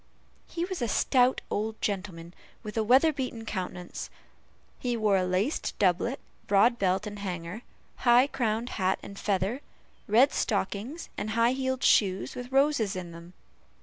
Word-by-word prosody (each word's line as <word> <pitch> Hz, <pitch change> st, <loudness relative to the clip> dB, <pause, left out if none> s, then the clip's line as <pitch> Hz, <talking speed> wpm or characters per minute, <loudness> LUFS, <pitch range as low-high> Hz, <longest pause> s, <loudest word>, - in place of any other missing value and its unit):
He 340 Hz, 0 st, -3 dB
was 370 Hz, -5 st, -5 dB
a 240 Hz, -, +1 dB
stout 250 Hz, +3 st, +2 dB
old 220 Hz, +1 st, -2 dB
gentleman, 185 Hz, -4 st, -4 dB, 0.3 s
with 210 Hz, -, -7 dB
a 220 Hz, -, +1 dB
weather 265 Hz, +8 st, +5 dB
beaten 255 Hz, -4 st, -4 dB
countenance; 180 Hz, -3 st, -5 dB, 0.7 s
he 245 Hz, -2 st, -1 dB
wore 215 Hz, -3 st, +2 dB
a 185 Hz, -, +2 dB
laced 185 Hz, -, -1 dB
doublet, 200 Hz, +7 st, +1 dB, 0.3 s
broad 220 Hz, +4 st, +4 dB
belt 190 Hz, +2 st, +1 dB
and 205 Hz, -1 st, -7 dB
hanger, 180 Hz, +1 st, -5 dB, 0.4 s
high 245 Hz, +1 st, +5 dB
crowned 235 Hz, -3 st, -1 dB
hat 185 Hz, +1 st, +2 dB
and 200 Hz, -, -9 dB
feather, 200 Hz, +6 st, -1 dB, 0.5 s
red 240 Hz, +7 st, +5 dB
stockings, 215 Hz, -, -2 dB
and 215 Hz, -, -3 dB
high 230 Hz, +2 st, +3 dB
heeled 260 Hz, -1 st, -2 dB
shoes, 190 Hz, -2 st, +3 dB
with 250 Hz, +1 st, -7 dB
roses 270 Hz, -7 st, +2 dB
in 180 Hz, -2 st, -6 dB
them. 170 Hz, +1 st, -12 dB
215 Hz, 150 wpm, -28 LUFS, 190-250 Hz, 0.7 s, weather